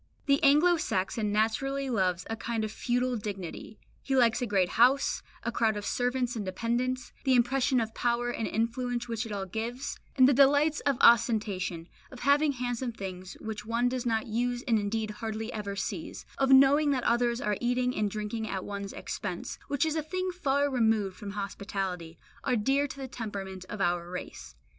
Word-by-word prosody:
The 280 0 +3
Anglo 305 +5 +5
Saxon 210 - -1
naturally 270 +6 0
loves 185 -7 0
a 225 - -3
kind 225 0 -3
of 215 - -3
feudal 245 +2 0
dignity; 205 -1 -6 0.2
he 270 - -1
likes 240 -3 +4
a 245 - 0
great 190 -4 +2
house, 260 +4 +3 0.2
a 235 - -1
crowd 225 -2 +1
of 205 - -5
servants 245 0 0
and 220 - -3
dependants, 240 +6 -2
the 265 -2 +3
impression 255 +2 +3
of 225 -1 -2
power 240 +1 0
and 225 -2 -3
influence 240 +2 -1
which 230 0 -3
it - - -8
all 200 -2 -3
gives; 235 +7 -4 0.2
and 260 -1 +7
the 280 - +5
delights 285 +3 +4
of 275 -3 +2
ostentation, 210 -7 +3 0.2
of 255 - -11
having 285 +2 +3
handsome 245 -1 -2
things 185 -3 -7
which 215 -1 -5
one 235 +3 +1
does 255 -1 -2
not 225 -1 +1
use 245 +2 -1
and 225 -3 +3
indeed 215 +1 -2
hardly 220 +2 -5
ever 200 -2 -4
sees, - - -5
of 270 -1 +2
knowing 275 +3 +6
that 260 -3 +1
others 235 0 +2
are 210 -3 -1
eating 250 +1 +1
and 210 -1 0
drinking 215 +2 -4
at 190 -1 -3
one's 200 -1 -5
expense, - - -5
which 285 +1 +1
is 315 -1 -1
a 315 - +1
thing 370 +4 -3
far 285 -5 +1
removed 220 -7 +1
from 200 0 -7
hospitality, 195 -4 -4 0.3
are - - +1
dear 270 +6 +2
to 275 - -9
the 270 -1 -5
temperament 195 -6 -6
of 210 - -6
our 175 -2 0
race. 180 0 -8
235 Hz, 185 wpm, -29 LUFS, 210-260 Hz, 0.3 s, and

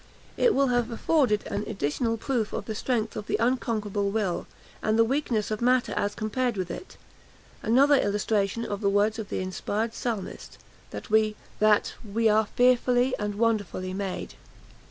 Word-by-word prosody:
It 475 - +3
will 275 -1 +3
have 245 -1 +1
afforded 235 -3 +1
an 205 - -3
additional 220 - -1
proof 230 -2 -2
of - - -3
the 220 - -4
strength 225 0 -1
of 210 - -5
the - - 0
unconquerable 215 -5 0
will, 200 -4 -1 0.3
and 215 +1 +1
the 230 - +6
weakness 235 -5 -1
of 215 - -2
matter 250 +1 +2
as 205 0 -1
compared 235 +1 -1
with 180 -2 -3
it; 365 - -9 0.6
another 270 +6 +4
illustration 210 -2 +1
of 205 0 -4
the 200 - +2
words 205 +3 +2
of 215 - -6
the - - -2
inspired 205 +4 -2
Psalmist, 225 -6 -5 0.3
that - - -8
"we 215 -1 +3 0.9
are 215 0 +3
fearfully 250 +1 +3
and 210 -1 -2
wonderfully 205 -4 -1
made." 195 -1 -4
220 Hz, 155 wpm, -27 LUFS, 205-245 Hz, 0.9 s, the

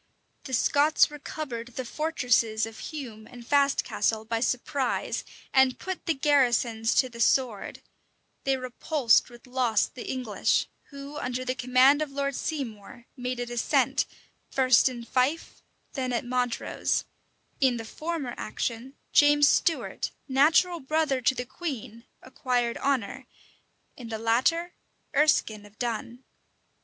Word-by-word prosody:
The 265 - -7
Scots 290 +6 +3
recovered 265 -5 -6
the 260 - -4
fortresses 235 -7 +1
of 225 0 -10
Hume 240 -8 -7
and 245 -2 -12
Fastcastle 275 -5 +1
by 230 0 -1
surprise, 255 +2 -1 0.3
and 265 -1 +4
put 375 -1 -6
the 330 - +2
garrisons 240 -5 +2
to 260 - +4
the 235 -2 -12
sword: 235 -3 +1 0.6
they 270 -1 +1
repulsed 255 0 +2
with 240 +1 -15
loss 250 -4 +1
the 250 - -9
English, 250 -6 0 0.2
who, 280 +1 -9
under 250 +1 -3
the 255 - 0
command 255 +3 +4
of 305 - -1
Lord 280 0 -2
Seymour, 240 -6 -5
made 250 -1 -4
a 245 - -2
descent, 240 -1 +1 0.4
first 260 -1 +4
in 240 -2 -7
Fife, 265 +7 -1 0.3
then 255 -2 -2
at 240 0 -1
Montrose: 245 -1 -1 0.5
in 260 -3 +3
the 225 - -6
former 305 0 -4
action, 240 +5 -4 0.2
James 290 0 +6
Stuart, 325 +2 +1 0.2
natural 315 +6 +3
brother 305 -1 0
to 260 +2 +2
the 245 - -4
queen, 245 -6 -6 0.2
acquired 250 -2 -1
honor; 265 -7 -1 0.7
in 240 -3 -9
the 220 - -3
latter, 265 +11 +1 0.4
Ereskine 275 -8 +2
of 205 +1 -17
Dun. 240 +1 -4
255 Hz, 130 wpm, -27 LUFS, 235-280 Hz, 0.7 s, James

